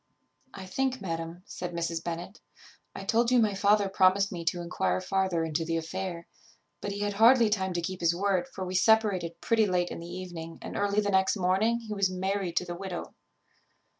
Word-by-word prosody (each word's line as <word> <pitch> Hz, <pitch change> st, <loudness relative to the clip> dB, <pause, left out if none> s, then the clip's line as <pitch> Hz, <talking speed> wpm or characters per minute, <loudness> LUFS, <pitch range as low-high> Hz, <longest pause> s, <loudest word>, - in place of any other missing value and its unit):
_ -, -, -48 dB, 0.5 s
"I 190 Hz, -1 st, -9 dB
think, 260 Hz, +7 st, -1 dB
madam," 165 Hz, -1 st, -5 dB
said 175 Hz, -1 st, -6 dB
Mrs. 170 Hz, -1 st, -2 dB
Bennet, 175 Hz, +4 st, -6 dB, 0.5 s
"I -, -, -6 dB
told 230 Hz, +4 st, +2 dB
you 250 Hz, -, +4 dB
my 215 Hz, -3 st, +3 dB
father 200 Hz, +1 st, +3 dB
promised 195 Hz, +1 st, +3 dB
me 175 Hz, -3 st, -5 dB
to 175 Hz, +2 st, 0 dB
enquire 95 Hz, -, -1 dB
farther 190 Hz, -, 0 dB
into 160 Hz, 0 st, -1 dB
the 165 Hz, 0 st, -1 dB
affair, 170 Hz, +1 st, -4 dB, 0.6 s
but 205 Hz, -, -3 dB
he 205 Hz, +1 st, -4 dB
had 205 Hz, 0 st, -1 dB
hardly 230 Hz, +1 st, +6 dB
time 190 Hz, -3 st, 0 dB
to 175 Hz, -, -1 dB
keep 185 Hz, +2 st, -4 dB
his 170 Hz, 0 st, +2 dB
word; 190 Hz, -1 st, 0 dB
for 190 Hz, 0 st, -6 dB
we 180 Hz, -, -5 dB
separated 190 Hz, -4 st, +2 dB
pretty 225 Hz, -2 st, +3 dB
late 180 Hz, -2 st, 0 dB
in -, -, -5 dB
the 170 Hz, -, -8 dB
evening 175 Hz, -2 st, -7 dB
and -, -, -8 dB
early 205 Hz, +1 st, +1 dB
the 205 Hz, -1 st, -1 dB
next 190 Hz, +2 st, +3 dB
morning 200 Hz, +6 st, +2 dB
he 220 Hz, -2 st, -6 dB
was 200 Hz, -2 st, +1 dB
married 185 Hz, -1 st, -2 dB
to 180 Hz, -, +2 dB
the 175 Hz, -, -5 dB
widow. 180 Hz, 0 st, -6 dB
185 Hz, 205 wpm, -28 LUFS, 170-205 Hz, 0.6 s, hardly